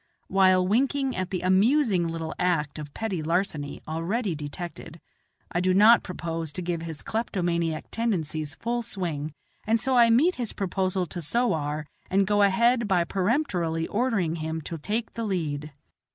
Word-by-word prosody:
While 185 -1 +4
winking 270 +5 +1
at 185 -1 -2
the 185 - -2
amusing 195 - +3
little 165 -1 -4
act 160 -5 0
of 150 -1 -7
petty 200 -7 -2
larceny 155 -3 -2
already 175 +6 -1
detected, 160 +2 -7 0.5
I 175 - 0
do 185 +1 +2
not 220 +4 +7
propose 165 -3 -4
to 180 - -5
give 170 -1 -2
his 165 -3 -6
kleptomaniac 170 -7 -1
tendencies 160 -10 -2
full 240 +1 -2
swing, 170 -9 -3 0.4
and 225 +1 +3
so 260 +3 0
I 235 -1 +6
meet 295 +11 +4
his 240 -4 -3
proposal 190 -1 -1
to 175 0 -6
sowar 155 -6 0 0.2
and 195 +1 +3
go 205 +1 +2
ahead 235 +4 +3
by 180 -3 +3
peremptorily 180 - 0
ordering 205 -8 0
him 160 0 -3
to 165 +2 -6
take 215 +8 -2
the 230 - -4
lead. 155 -7 -2
185 Hz, 155 wpm, -26 LUFS, 165-225 Hz, 0.5 s, not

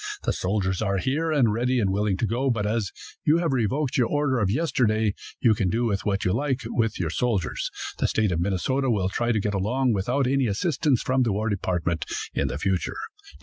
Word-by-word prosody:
The - - 0
soldiers 95 0 -1
are 100 -2 +1
here, 150 - 0
and 125 -8 +3
ready 125 +3 +1
and 100 -4 +1
willing 100 -1 0
to 115 - 0
go, 120 +6 0
but 115 -4 0
as 105 -2 -1 0.3
you 155 +2 +4
have 170 -4 0
revoked 130 +3 0
your 125 -3 +3
order 145 -3 +1
of 100 -4 +1
yesterday, 110 -6 +1 0.3
you 115 -3 +4
can 100 -3 0
do 115 +1 +1
what 100 -1 -1
you 90 - +2
like 135 +2 0
with 115 -2 -1
your 85 -3 -1
soldiers. 105 -6 -1 0.3
The - - +2
State 110 -3 +1
of 85 - 0
Minnesota 100 +9 0
will 100 -5 +1
try 120 +5 0
to 110 - +1
get 105 0 -1
along 120 +6 +1
without 125 +8 0
any 135 0 +2
assistance 135 - +1
from 130 0 +1
the 120 -3 +2
war 105 +3 -1
department 90 -5 -1 0.3
in - - 0
the - - -3
future. 95 -4 -1
110 Hz, 210 wpm, -25 LUFS, 100-130 Hz, 0.3 s, you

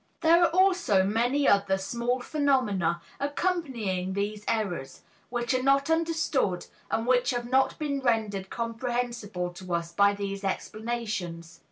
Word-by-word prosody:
There 335 +1 +5
are 340 - +5
also 360 - +3
many 240 +8 +1
other 200 -1 +3
small 235 +5 -2
phenomena 245 - +1 0.2
accompanying 265 - -1
these 205 +1 -2
errors, 180 -12 -2 0.3
which 240 0 -1
are 255 - +1
not 275 +3 +3
understood 320 - 0 0.2
and 225 - 0
which 250 +1 +3
have 240 -2 -1
not 265 +2 +2
been 285 -2 -2
rendered 215 -6 0
comprehensible 230 -5 -3
to 180 -1 -4
us 170 0 -3
by 200 +3 +4
these 200 0 -4
explanations. 200 -6 -4
230 Hz, 135 wpm, -28 LUFS, 195-265 Hz, 0.3 s, There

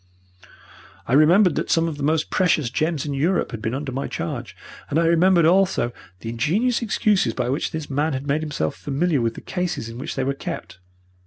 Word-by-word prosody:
I 120 - -2
remembered 170 +6 +5
that - - -2
some 165 0 +3
of 155 -3 -4
the - - -7
most 155 +2 0
precious 160 -9 +2
gems 155 0 -1
in 145 - -3
Europe 165 +7 0
had 115 -3 -6
been 110 +3 -2
under 140 0 -4
my 135 +2 -3
charge, - - -5 0.3
and 145 - 0
I 165 - +3
remembered 170 +1 +4
also 185 -7 +3 0.3
the 115 - -5
ingenious 190 - +1
excuses 200 - +1
by 125 -1 -1
which 135 +4 -1
this 160 -2 -5
man 145 +2 0
had 130 +1 -4
made 145 +2 0
himself 150 - -2
familiar 145 0 0
with 115 -1 -1
the - - -8
cases 180 -10 -3
in 115 +1 -8
which 130 - -5
they 135 - -1
were 135 +1 0
kept. 135 - -7
150 Hz, 210 wpm, -22 LUFS, 135-170 Hz, 0.3 s, remembered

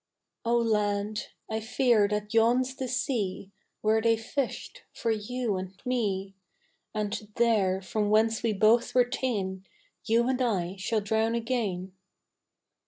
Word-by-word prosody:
Oh 235 +1 +2
lad, 210 -2 0 0.2
I 220 0 -2
fear 225 -1 +3
that 210 +1 -3
yon's 245 +3 +3
the 265 -1 -4
sea 230 -7 -2 0.3
Where 220 +1 +3
they 230 0 +3
fished 275 - -4
for 230 - -1
you 220 0 -2
and 185 +1 -7
me, 200 -6 -1 0.6
And 210 0 -3
there, 200 -5 +2
from 205 +2 -1
whence 220 +1 +3
we 230 -1 +1
both 220 +4 +3
were 250 -1 +6
ta'en, 200 -7 -2 0.4
You 235 +2 +3
and 260 0 0
I 190 -7 0
shall 215 +3 0
drown 220 +2 +1
again. 215 -6 -2
220 Hz, 135 wpm, -28 LUFS, 205-235 Hz, 0.6 s, were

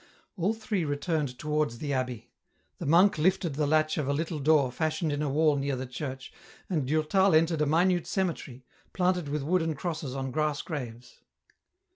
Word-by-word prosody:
All 200 +4 0
three 215 -4 -2
returned 145 -2 -2
towards 150 -3 -1
the 145 +3 -3
abbey; 125 -3 -3 0.5
the - - -4
monk 175 +4 +5
liftea 175 0 +1
the 150 +1 0
latch 155 +1 +2
of 145 - -1
a 140 - +1
little 160 +1 -2
door 145 -3 +3
fashioned 155 +3 -1
in 145 0 -2
a 150 - 0
wall 150 +1 +3
near 140 0 -1
the 130 +1 -4
church, 130 +1 -6 0.4
and 150 -7 0
Durtal 155 +5 +3
entered 160 0 +3
a 150 - +2
minute 175 +3 +2
cemetery, 155 -9 -3 0.3
planted 180 -4 0
with 150 -1 -2
wooden 165 0 +1
crosses 155 -4 -4
on 135 -1 -3
grass 150 0 -1
graves. 125 -6 -7
150 Hz, 175 wpm, -28 LUFS, 140-165 Hz, 0.5 s, monk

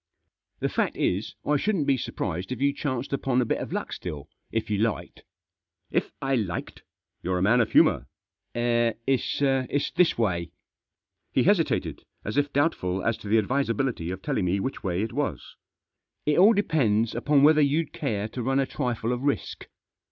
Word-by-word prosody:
" - - -53
The - - +1
fact - - -1
is> 95 +5 -1
I 150 0 +3
shouldn't 185 -2 0
be 140 - +3
surprised 95 -5 -4
if 130 - -3
you 140 +1 +2
chanced 135 -3 -3
upon 135 -2 +1
a 125 - +2
bit - - -1
of - - -5
luck - - -3
stsll> 75 -3 -6 0.3
if 115 -1 -1
you 105 - +1
liked." 110 0 -2 0.4
" - - -65 0.3
If - - 0
I 135 0 -1
liked 105 -9 -2
I, - - -33 0.3
You're 90 +1 -1
a 90 - 0
man 120 +5 +4
of 115 - -1
humour." - - +4 0.3
" - - -53
It's 120 +3 0
this 180 - +3
way." 90 -7 -1 0.8
He - - +2
hesitated, - - +1 0.2
as 105 - -3
if 145 0 +1
doubtful 95 - 0
as 115 - +2
to - - -10
the 110 +3 +3
advisability 115 -5 0
of 95 +1 -6
telling 95 - 0
me 95 +3 +1
which 130 +5 -4
way 95 0 -1
it 115 - -4
was* 125 - -3 0.3
" - - -57
It 150 +2 +3
all 205 +5 +7
depends 120 - +1
upon 140 +3 +2
whether 155 +1 +6
you'd 150 +2 +1
care 105 -1 -2
to 125 - -5
run 135 +3 +1
a 135 - +2
trifle 120 -2 -2
of 125 - -3
risk." 140 0 -2
120 Hz, 190 wpm, -26 LUFS, 105-140 Hz, 0.8 s, all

